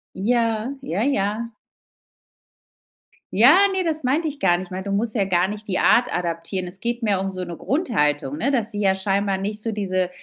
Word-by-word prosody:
Ja, 230 +3 0
ja, 210 -5 -2
ja. 230 -3 0 1.8
Ja, 250 - +7 0.2
ne, 375 - +1
das 315 -3 -2
meinte 290 +6 +1
ich 290 -1 -6
gar 175 -8 +3
nicht 185 0 -8
mal. 185 +1 -4
Du 200 +1 -5
musst 215 +3 0
ja 205 - +2
gar 180 -1 +2
nicht 210 +1 -7
die 185 -2 -1
Art 245 - +4
adaptieren. 175 +2 -3
Es 180 +2 -8
geht 235 +2 -3
mehr 200 -4 +1
um 195 - -2
so 185 -1 -5
'ne 175 -1 -6
Grundhaltung, 150 - 0
ne, 245 - 0
dass 230 -5 0
sie 205 - -5
ja 190 -1 +3
scheinbar 195 0 0
nicht 210 +2 -4
so 225 - -2
diese 185 -3 -1
205 Hz, 200 wpm, -22 LUFS, 185-235 Hz, 1.8 s, Ja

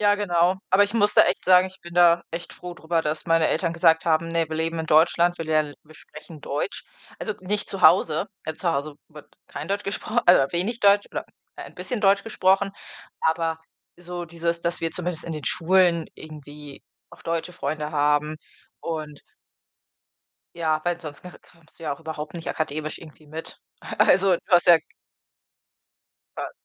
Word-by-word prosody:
Ja, 205 -1 +4
genau. 180 -3 +2 0.2
Aber 195 +2 +6
ich 205 +3 -1
muss 210 -2 +3
da - - +8
echt - - -1
sagen: 185 0 +6
„Ich 190 0 -13
bin 175 0 -10
da 175 -1 +5
echt 170 +1 -6
froh 180 0 -8
drüber, 165 0 -1
dass 155 +3 -3
meine 165 -1 +3
Eltern 170 +1 0
gesagt 160 -1 +3
haben: 165 +1 +2
‚Ne, 165 -1 0
wir 160 - -4
leben 165 +1 -2
in 160 - -3
Deutschland, 170 +3 +3
wir 165 - -4
lern 155 -2 0
wir 155 +1 -18
sprechen 155 0 -13
Deutsch.‘“ 145 +9 -4 0.3
Also, 215 - -4
nicht 205 +3 -2
zu 195 - -3
Hause 160 +1 +5 0.3
zu 170 +1 -1
Hause 145 +1 -3
wird 150 -1 -14 0.2
kein 145 +4 -7
Deutsch 200 +1 -1
gespro 215 +3 -2
also, 175 -5 +7
wenig 200 +7 -1
Deutsch 205 0 +4
oder - - -4 0.3
ein - - -10
bisschen 245 -4 -4
Deutsch 200 0 +3
gesprochen, 195 -2 +1 0.5
aber 160 0 0 0.4
so 175 0 -6
dieses, 170 0 -3
dass 170 +1 -2
wir 165 -1 -1
zumindest 175 -1 -4
in 170 - -5
den 155 -2 -6
Schulen 175 -1 +2
irgendwie 150 -2 -11 0.3
auch - - -16
deutsche 165 +2 -3
Freunde 150 -1 -4
haben. 150 0 +1 0.4
Und 155 -3 -5 1.4
ja, 155 -2 0
weil 175 0 -1
sonst 150 -4 -8
g 180 - -9
kr - - -16
kommst 165 -2 -23
du 165 - -10
ja 145 - -2
auch - - -20
überhaupt 155 0 -7
nicht 165 -1 -6
akademisch 155 0 -3
irgendwie 155 -2 -15
mit. 160 +2 -8 0.2
A - - -7
also, 195 +1 +5
du - - -4
hast 175 0 +5
ja 170 -2 +8 1.6
Fa - - -4
165 Hz, 185 wpm, -24 LUFS, 155-180 Hz, 1.6 s, da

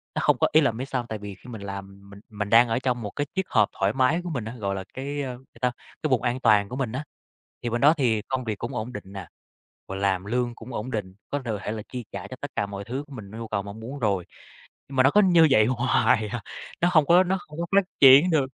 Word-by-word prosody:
nó - - 0
không - - +3
có, - - +4
ý 155 - +6
là, 140 - +3
biết 120 +4 -5
sao 130 - -1
hông, 120 - -12
tại 110 - -4
vì 100 -1 -8
khi 125 - -15
mình 110 -4 -8
làm, 100 0 -8
mình 100 - -12
mình 105 -2 -4
đang 115 +2 +7
ở 115 - +1
trong 125 -2 -1
một 105 - -4
cái 145 -1 -3
chiếc 190 -1 -1
hộp 105 -5 +3
thoải 100 +2 +2
mái 135 +7 +2
của 180 - -4
mình 125 -9 -3
á, 110 +3 -6
gọi 100 -1 -2
là, 95 - -4
cái, 140 +2 -4
ơ, 125 -3 -5
gì 130 - -19 0.2
ta, 125 -1 +2 0.3
cái 155 - +1
vùng 130 -3 +2
an 125 +1 -1
toàn 105 -5 +4
của 125 - -5
mình 130 -4 -2
á. 130 +5 -4 0.6
Thì 120 - -1
bên 120 +2 -2
đó 150 +3 +7
thì 115 -6 +2
công 130 -1 -2
việc 110 -3 -3
cũng - - -5
ổn 115 +3 -4
định 105 - -6
nè, 95 -3 -7 0.6
rồi 95 - -4
làm 95 -1 0
lương 120 +2 -1
cũng 120 +2 -10
ổn 120 +4 -4
định, 100 -5 -4 0.2
có 145 - -1
th 130 - -11 0.2
thể 105 - -3
là 110 -1 -4
chi 125 -3 -6
trả 100 0 -6
cho 130 - -8
tất 145 - -5
cả 100 - 0
mọi 100 0 -6
thứ 130 +6 -4
của 145 - -12
mình, 100 -3 -9
nhu 115 +1 -6
cầu 100 -2 -2
mong 100 +2 -9
muốn 130 +6 -7
rồi. 100 -6 0 0.6
Nhưng 135 - -8
mà 130 - +5
nó 135 - +5
có 210 - +6
như 175 -4 +6
vậy 110 -5 +6
hoài 120 -3 +2
à, 120 +2 -4 0.4
nó 175 - +4
hông 155 -3 +5
có 175 +2 +6
nó 190 +1 0
hông 150 +2 -9
có 170 - -1
phát 200 - +5 0.2
triển 140 +5 +9
được. 145 -4 +3
120 Hz, 295 wpm, -25 LUFS, 105-135 Hz, 0.6 s, triển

